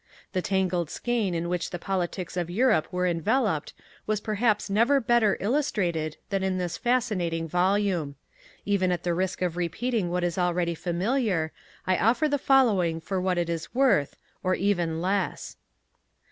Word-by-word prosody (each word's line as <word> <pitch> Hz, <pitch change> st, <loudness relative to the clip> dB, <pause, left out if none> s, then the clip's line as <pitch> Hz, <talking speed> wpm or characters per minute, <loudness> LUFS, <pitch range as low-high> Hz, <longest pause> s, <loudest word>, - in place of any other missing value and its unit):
The 185 Hz, -, 0 dB
tangled 185 Hz, -4 st, 0 dB
skein 225 Hz, -7 st, -1 dB
in 170 Hz, +1 st, -2 dB
which 180 Hz, 0 st, -2 dB
the 175 Hz, -, -4 dB
politics 180 Hz, -1 st, -3 dB
of 175 Hz, -2 st, -2 dB
Europe 215 Hz, -3 st, +2 dB
are 180 Hz, 0 st, 0 dB
enveloped 175 Hz, -, 0 dB, 0.3 s
was 215 Hz, -1 st, +1 dB
perhaps 215 Hz, 0 st, 0 dB
never 230 Hz, +8 st, +3 dB
better 235 Hz, -4 st, +3 dB
illustrated 190 Hz, -, -1 dB
than 195 Hz, -1 st, 0 dB
in 190 Hz, -1 st, 0 dB
this 175 Hz, -2 st, -2 dB
fascinating 200 Hz, -10 st, 0 dB
volume. 180 Hz, -3 st, +1 dB, 0.5 s
Even 195 Hz, -2 st, +1 dB
at 175 Hz, -, -2 dB
the 175 Hz, -, 0 dB
risk 185 Hz, +1 st, -1 dB
of 175 Hz, -2 st, -1 dB
repeating 180 Hz, +4 st, -1 dB
what 180 Hz, 0 st, -1 dB
is 175 Hz, +1 st, -1 dB
already 175 Hz, -1 st, +1 dB
familiar, 180 Hz, 0 st, 0 dB, 0.3 s
I 185 Hz, -1 st, +2 dB
offer 245 Hz, +8 st, +3 dB
the 285 Hz, -1 st, 0 dB
following 205 Hz, -13 st, +3 dB
for 185 Hz, +3 st, -3 dB
what 185 Hz, -1 st, 0 dB
it 175 Hz, -1 st, 0 dB
is 165 Hz, +5 st, -4 dB
worth 235 Hz, -, +3 dB, 0.3 s
or 185 Hz, 0 st, +1 dB
even 175 Hz, -4 st, 0 dB
less. 195 Hz, +2 st, -2 dB
185 Hz, 160 wpm, -26 LUFS, 175-215 Hz, 0.5 s, never